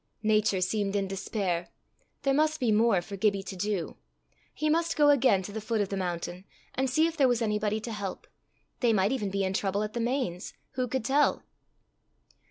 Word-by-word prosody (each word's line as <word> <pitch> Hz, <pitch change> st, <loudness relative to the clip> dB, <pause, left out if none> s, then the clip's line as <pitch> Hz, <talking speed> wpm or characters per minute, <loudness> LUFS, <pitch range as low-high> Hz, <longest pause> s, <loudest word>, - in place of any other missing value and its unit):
Nature 215 Hz, -3 st, +2 dB
seemed 200 Hz, +1 st, 0 dB
in 200 Hz, -1 st, 0 dB
despair. 190 Hz, -2 st, -2 dB, 0.6 s
There 275 Hz, -, +2 dB
must 310 Hz, +2 st, +2 dB
be 245 Hz, -4 st, +2 dB
more 210 Hz, -4 st, +3 dB
for 200 Hz, -, -7 dB
Gibbie 200 Hz, 0 st, +1 dB
to 190 Hz, -, -7 dB
do! 200 Hz, -2 st, -2 dB, 0.5 s
He 305 Hz, -, -2 dB
must 330 Hz, +2 st, +1 dB
go 295 Hz, -1 st, +6 dB
again 255 Hz, -9 st, +4 dB
to 205 Hz, -, -7 dB
the 220 Hz, +1 st, -5 dB
foot 220 Hz, +1 st, -1 dB
of 200 Hz, -2 st, 0 dB
the 200 Hz, -, -2 dB
mountain, 180 Hz, 0 st, -4 dB, 0.3 s
and 265 Hz, 0 st, 0 dB
see 310 Hz, +5 st, +3 dB
if 330 Hz, 0 st, -1 dB
there 280 Hz, -4 st, +4 dB
was 245 Hz, -2 st, +2 dB
anybody 210 Hz, 0 st, 0 dB
to 230 Hz, -, -5 dB
help. 200 Hz, -3 st, -5 dB, 0.5 s
They 235 Hz, -3 st, +3 dB
might 200 Hz, +1 st, +2 dB
even 225 Hz, -7 st, -1 dB
be 195 Hz, 0 st, -1 dB
in 190 Hz, 0 st, -1 dB
trouble 200 Hz, +1 st, 0 dB
at 215 Hz, -, -5 dB
the 240 Hz, -, -3 dB
Mains, 235 Hz, -7 st, -2 dB, 0.2 s
who 255 Hz, -1 st, -2 dB
could 255 Hz, -2 st, -2 dB
tell! 285 Hz, +4 st, +2 dB
215 Hz, 200 wpm, -28 LUFS, 195-255 Hz, 0.6 s, go